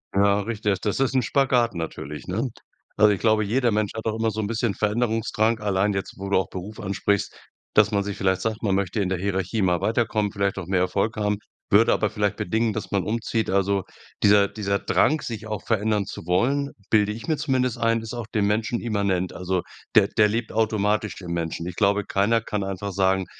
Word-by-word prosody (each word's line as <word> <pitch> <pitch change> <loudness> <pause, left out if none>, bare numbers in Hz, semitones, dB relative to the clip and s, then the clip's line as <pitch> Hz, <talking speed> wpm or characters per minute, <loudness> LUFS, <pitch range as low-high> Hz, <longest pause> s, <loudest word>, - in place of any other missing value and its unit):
Ja, 100 +1 +4
richtig. 105 -2 -1
Das 105 +5 -2
ist 135 0 +1
'n 130 - +4
Spagat 125 -2 +2
natürlich, 75 -3 -6
ne? 115 +8 -1 0.5
Also 105 0 +5
ich 100 - 0
glaube, 110 -1 +3
jeder 120 +3 +1
Mensch 105 -1 0
hat 110 - -5
auch 110 - 0
immer 110 0 +1
so 110 - -5
'n 105 - -1
bisschen 115 -1 0
Veränderungsdrang. 110 +1 0
Allein 100 0 +1
jetzt, 95 - -4
wo 100 +1 -5
du 100 - +3
auch 95 - 0
Beruf 95 +4 -7
ansprichst, 100 +1 -1 0.4
dass 105 +1 +5
man 100 -1 +1
sich 100 0 -5
vielleicht 95 -1 +1
sagt, 110 -1 -2
man 100 -3 +1
möchte 100 +2 -1
in 95 - 0
der 95 -2 -1
Hierarchie 95 +2 -1
mal 90 -2 +2
weiterkommen, 110 -2 0
vielleicht 100 -1 -1
auch 95 - -4
mehr 95 -1 +1
Erfolg 100 +4 0
haben, 105 -1 0 0.3
würde 110 +3 +5
aber 105 - +1
vielleicht 105 -1 -1
bedingen, 110 +4 0
dass - - -5
man 100 -2 +1
umzieht. 115 0 -1
Also 100 0 +1 0.4
dieser 100 -1 +6
dieser 100 -1 -2
Drang, 155 +9 +2
sich 110 -2 -6
auch 105 -1 -4
verändern 105 -2 +1
zu - - -8
wollen, 135 +11 +1 0.2
bilde 105 -1 +3
ich 110 +2 -7
mir 160 - +2
zumindest 130 -5 0
ein, 115 -1 +1
ist 115 +1 -7
auch 120 -2 -4
dem 105 -2 0
Menschen 110 +3 0
immanent. 100 -5 -1
Also, 90 0 -1 0.3
der 100 -2 +6
der 105 +1 +3
lebt 115 +1 -2
automatisch 110 -1 0
im 85 -2 -5
Menschen. 85 0 -3
Ich 90 - -6
glaube, 100 0 +2
keiner 105 +5 +2
kann 105 -2 -3
einfach 95 0 -4
sagen: 95 0 +2
105 Hz, 215 wpm, -24 LUFS, 100-110 Hz, 0.5 s, dieser